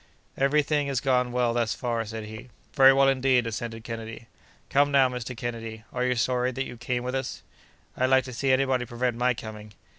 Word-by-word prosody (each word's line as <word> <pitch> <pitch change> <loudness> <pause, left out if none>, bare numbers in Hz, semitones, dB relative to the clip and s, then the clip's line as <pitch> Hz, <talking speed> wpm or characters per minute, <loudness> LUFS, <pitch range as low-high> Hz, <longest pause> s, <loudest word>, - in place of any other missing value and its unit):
"Every 140 +2 +2
thing 145 0 0
has 135 -3 0
gone 125 -1 +1
well 120 -1 +1
thus 115 -2 0
far," 115 -2 -2
said 110 +1 -6
he. 110 +4 -9 0.2
"Very 135 -1 +8
well 135 0 +4
indeed!" 130 -2 +3
assented 115 0 -5
Kennedy. 115 0 -7 0.4
"Come, 145 +1 +3
now, 135 -2 +5
Mr. 125 -1 -6
Kennedy, 115 -2 -5
are 125 - -1
you 125 0 +1
sorry 125 +2 +1
that 135 +2 -2
you - - -8
came 120 +1 -3
with 125 +1 -3
us?" 135 -1 -4 0.5
"I'd 130 - +1
like 130 0 +4
to 125 0 -8
see 135 +3 0
anybody 130 -2 +1
prevent 120 0 -1
my 125 +1 +1
coming!" 105 -1 -9
125 Hz, 205 wpm, -26 LUFS, 115-130 Hz, 0.5 s, Very